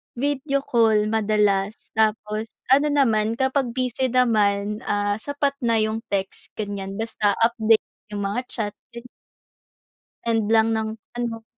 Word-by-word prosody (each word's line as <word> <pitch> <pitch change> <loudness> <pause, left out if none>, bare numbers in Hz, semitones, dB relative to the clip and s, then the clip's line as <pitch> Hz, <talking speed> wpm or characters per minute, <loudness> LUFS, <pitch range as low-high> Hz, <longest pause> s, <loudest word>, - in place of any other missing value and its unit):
Video 275 +1 -1
call, 220 -4 +3
madalas 210 -1 +1
tapos 215 0 0 0.2
ano 285 +3 +5
naman 230 -6 +2
kapag 265 -1 0
busy 255 0 0
naman, 210 -4 +2
ah, 205 0 0
sapat 285 +2 -1
na 235 -4 +1
yung 220 +1 0
text 195 -2 -4
ganiyan, 200 -2 -4
basta 220 -2 0
update 225 -1 +3 0.3
yung 205 -1 -3
mga 200 +5 -1
chat 210 -4 -3 0.2
ganyan. 235 +1 -9 1.2
End 225 -2 +1
lang 225 0 +4
ng 220 0 -1 0.3
ano 230 -2 -3
220 Hz, 130 wpm, -23 LUFS, 210-245 Hz, 1.2 s, ano